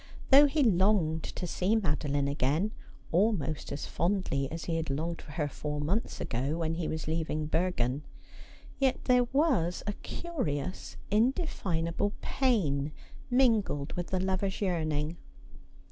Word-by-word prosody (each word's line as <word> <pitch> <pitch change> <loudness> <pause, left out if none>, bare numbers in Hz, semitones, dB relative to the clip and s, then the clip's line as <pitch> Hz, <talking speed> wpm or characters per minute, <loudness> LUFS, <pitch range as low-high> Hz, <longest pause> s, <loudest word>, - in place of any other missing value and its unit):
Though 285 +2 +9
he 290 +1 +2
longed 185 -6 +3
to 180 - -5
see 185 +5 +1
Madeline 145 -7 0
again, 145 +8 +1 0.4
almost 170 -5 +1
as 140 - -4
fondly 170 -7 0
as 165 0 -5
he 165 -1 -1
had 165 -2 -3
longed 160 +5 -2
for 145 - -11
her 150 -2 0
four 150 +1 -4
months 180 +10 -1
ago 135 +6 -1
when 165 -1 -1
he 165 -1 -2
was 160 0 -3
leaving 155 -1 -1
Bergen, 150 -5 0 0.8
yet 265 -2 +1
there 250 -1 +4
was 250 - +1
a 205 - -1
curious 185 - -4
indefinable 205 - +1
pain 155 - +1 0.4
mingled 225 - +2
with 175 -1 -3
the 185 - -1
lover's 190 +1 -1
yearning. 160 -4 -1
170 Hz, 135 wpm, -30 LUFS, 150-210 Hz, 0.8 s, Though